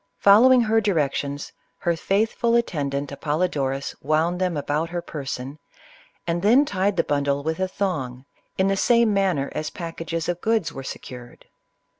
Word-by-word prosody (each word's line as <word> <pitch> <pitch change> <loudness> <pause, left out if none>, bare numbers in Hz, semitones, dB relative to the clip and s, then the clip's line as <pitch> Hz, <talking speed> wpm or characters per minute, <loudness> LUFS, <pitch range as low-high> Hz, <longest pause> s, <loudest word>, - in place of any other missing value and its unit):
Following 245 +6 +6
her 225 0 +2
directions, 145 -7 -1 0.2
her 170 -1 0
faithful 220 +6 +1
attendant 145 -11 -1
Apol 150 +3 -2
lodorus 135 -6 -1
wound 160 +5 0
them 180 -4 0
about 150 +3 -1
her 175 0 -3
person, 140 -3 -6 0.7
and 170 0 -1
then 240 +9 +5
tied 200 -3 0
the 165 - +3
bundle 140 -1 0
with 160 +3 -2
a 190 - +1
thong 135 -11 -3 0.3
in 190 - +2
the 195 - +2
same 235 +1 +3
manner 185 -8 +1
as 155 - -3
pack 165 -2 -7
ages 165 0 -3
of 175 0 -2
goods 220 -5 0
were 135 - -6
secured. 125 -2 -9
165 Hz, 160 wpm, -23 LUFS, 145-195 Hz, 0.7 s, Following